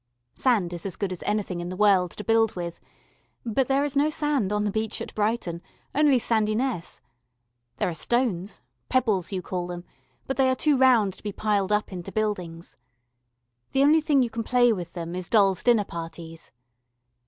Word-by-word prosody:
Sand 210 -9 +1
is 170 - -4
as 195 -3 -4
good 200 -2 -3
as 180 - -6
anything 205 -4 -1
in 175 0 -5
the 185 - -5
world 190 -3 +4
to 210 - -8
build 225 +1 +2
with 170 -2 -5 0.7
but 240 +3 0
there 275 +1 +2
is 290 -1 -4
no 290 +2 +3
sand 295 -9 0
on 210 0 0
the 205 - 0
beach 220 +1 -2
at - - -7
Brighton, 210 -6 -1 0.3
only 290 -2 +4
sandiness. 220 -3 0 0.8
There - - 0
are 175 - -2
stones 215 -1 -1 0.3
pebbles 215 -9 +1
you 185 -2 -3
call 180 0 -3
them, 175 0 -6 0.4
but 270 - -3
they 265 -1 +4
are 260 - +2
too 295 +2 +2
round 245 -7 +4
to - - -13
be 210 - -4
piled 205 -1 0
up 210 -1 0
into 180 +1 -7
buildings. 180 -6 -3 1.0
The 270 - +4
only 310 +3 +5
thing 290 -4 +3
you 235 - -3
can 230 0 -3
play 245 0 +3
with 175 -4 -6
them 170 -1 -5
is 180 0 -4
dolls' 195 -4 +3
dinner 235 -4 +3
parties. 165 -1 -8
210 Hz, 190 wpm, -25 LUFS, 180-245 Hz, 1.0 s, only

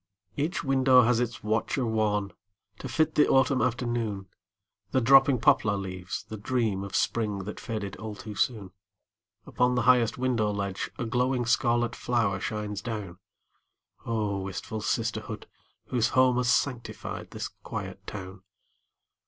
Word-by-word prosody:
Each 150 +5 -1
window 130 -2 +5
has 115 0 +3
its 120 -1 -3
watcher 110 +4 0
wan 105 -3 0 0.5
To 135 - -6
fit 155 +6 +1
the 150 - +4
autumn 135 0 +3
afternoon, 115 -5 -1 0.6
The 130 - +2
dropping 135 +2 +6
poplar 105 -2 +3
leaves, 95 -2 -5
the 110 - -6
dream 110 -3 -1
Of 100 - -6
spring 105 -4 0
that 105 - -7
faded 110 -3 -4
all 105 +1 -6
too 105 +1 -8
soon. 105 -4 -1 0.7
Upon 125 0 +1
the 120 - +1
highest 125 -3 +4
window 125 -4 +1
ledge 100 -2 -3
A 120 - -3
glowing 125 +2 0
scarlet 120 -1 +2
flower 115 -6 0
shines 105 -1 -3
down. 105 -6 -5 0.8
Oh, 105 -4 -1
wistful 95 +3 -5
sisterhood, - - -2 0.4
whose 120 -2 +2
home 130 0 +3
Has 125 -1 +2
sanctified 120 +1 -2
this - - -5
quiet - - -6
town! 95 -1 -7
115 Hz, 140 wpm, -28 LUFS, 105-125 Hz, 0.8 s, dropping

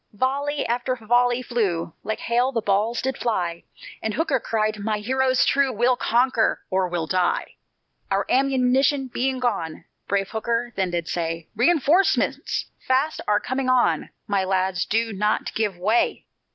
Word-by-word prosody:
Volley 280 +6 -1
after 245 +2 -1
volley 245 +2 +2
flew, 195 -10 -1
Like 220 +1 -3
hail 245 +3 +1
the 240 - 0
balls 210 +4 +1
did 265 0 -2
fly, 175 -7 -1 0.4
And 220 -1 -2
Hooker 300 -5 +1
cried: 215 -2 -1
"My 210 +1 -1
heroes 260 +4 +2
true, 275 -1 +2
We'll 245 +2 +2
conquer 240 -1 +1
or 185 0 +1
we'll 175 -2 -2
die." 180 +1 -1 0.5
Our - - +1
ammunition 265 +1 +2
being 260 +1 0
gone, 200 -11 -2 0.2
Brave 195 0 -1
Hooker 235 +2 -2
then 190 -2 0
did 170 -1 -3
say: 165 -1 -3
"Reënforcements 320 - +2
fast 270 +4 0
are 210 0 +3
coming 260 0 -2
on, 240 -12 +2 0.2
My 200 -2 0
lads, 185 -2 0
do 225 0 0
not 210 +2 0
give 210 -5 -1
way. 215 +6 +1
230 Hz, 150 wpm, -23 LUFS, 195-255 Hz, 0.5 s, are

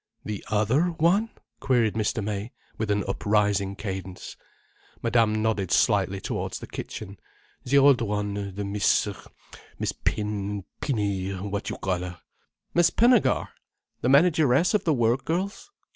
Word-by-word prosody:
"The 105 -1 -5
other 110 +9 +2
one—?" 195 +8 +3 0.3
queried 120 -5 +2
Mr. 110 0 -1
May, 105 +2 -4 0.2
with 110 -1 -3
an 105 -1 +1
uprising 100 -1 +1
cadence. 95 -3 -6 0.7
Madame 115 -2 +2
nodded 105 -5 0
slightly 100 +1 +2
towards - - -3
the - - -8
kitchen. 100 -2 -8 0.5
"The 140 +3 +3
old 140 -2 +6
one—the 100 -2 -3
Miss—Miss 100 0 -2
Pin—Pinny—what 100 -1 -3
you - - -4
call 95 -2 -1
her." 90 -1 -7 0.5
"Miss 175 0 +5
Pinnegar! 235 +1 +3 0.5
The 125 - +1
manageress 155 - +4
of 210 - +1
the 160 - +3
work 120 +1 +1
girls? 185 - -3
105 Hz, 120 wpm, -26 LUFS, 100-130 Hz, 0.7 s, old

